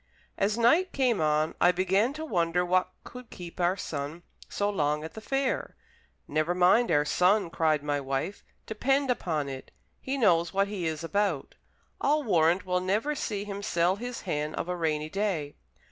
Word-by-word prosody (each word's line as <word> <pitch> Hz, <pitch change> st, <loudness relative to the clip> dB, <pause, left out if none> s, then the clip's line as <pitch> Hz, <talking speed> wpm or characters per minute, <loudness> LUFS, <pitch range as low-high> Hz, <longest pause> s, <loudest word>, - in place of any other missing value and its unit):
As 205 Hz, +3 st, 0 dB
night 320 Hz, +11 st, +3 dB
came 250 Hz, -, +1 dB
on, 155 Hz, 0 st, +1 dB
I 175 Hz, -, +6 dB
began 190 Hz, +6 st, +1 dB
to 310 Hz, +2 st, -6 dB
wonder 180 Hz, -, +1 dB
what 185 Hz, +1 st, +2 dB
could 250 Hz, -2 st, -11 dB
keep 175 Hz, 0 st, -10 dB
our 180 Hz, +2 st, +2 dB
son 150 Hz, +1 st, -5 dB, 0.3 s
so 205 Hz, -, -1 dB
long 150 Hz, -6 st, 0 dB
at 160 Hz, -, -7 dB
the 220 Hz, -, -8 dB
fair. 270 Hz, +2 st, -1 dB, 0.5 s
"Never 155 Hz, +4 st, 0 dB
mind 185 Hz, +6 st, +4 dB
our 150 Hz, -3 st, +3 dB
son," 180 Hz, +3 st, +2 dB
cried 155 Hz, -3 st, +1 dB
my 145 Hz, -1 st, 0 dB
wife, 135 Hz, +8 st, -3 dB, 0.2 s
"depend 270 Hz, +5 st, +1 dB
upon 160 Hz, -11 st, -1 dB
it, 135 Hz, -1 st, -7 dB, 0.3 s
he 270 Hz, +1 st, -3 dB
knows 170 Hz, -8 st, +3 dB
what 195 Hz, 0 st, +3 dB
he 190 Hz, -5 st, -3 dB
is 160 Hz, 0 st, -3 dB
about. 190 Hz, -4 st, -1 dB, 0.5 s
I'll 300 Hz, +2 st, +2 dB
warrant 175 Hz, -, +2 dB
we'll 180 Hz, 0 st, +1 dB
never 210 Hz, +11 st, 0 dB
see 210 Hz, -8 st, -3 dB
him 200 Hz, -1 st, -6 dB
sell 180 Hz, -2 st, +1 dB
his 245 Hz, +2 st, -6 dB
hen 150 Hz, -4 st, -3 dB
of -, -, -3 dB
a 180 Hz, -, -2 dB
rainy 155 Hz, -3 st, -1 dB
day. 175 Hz, -6 st, -2 dB
180 Hz, 175 wpm, -28 LUFS, 160-215 Hz, 0.5 s, I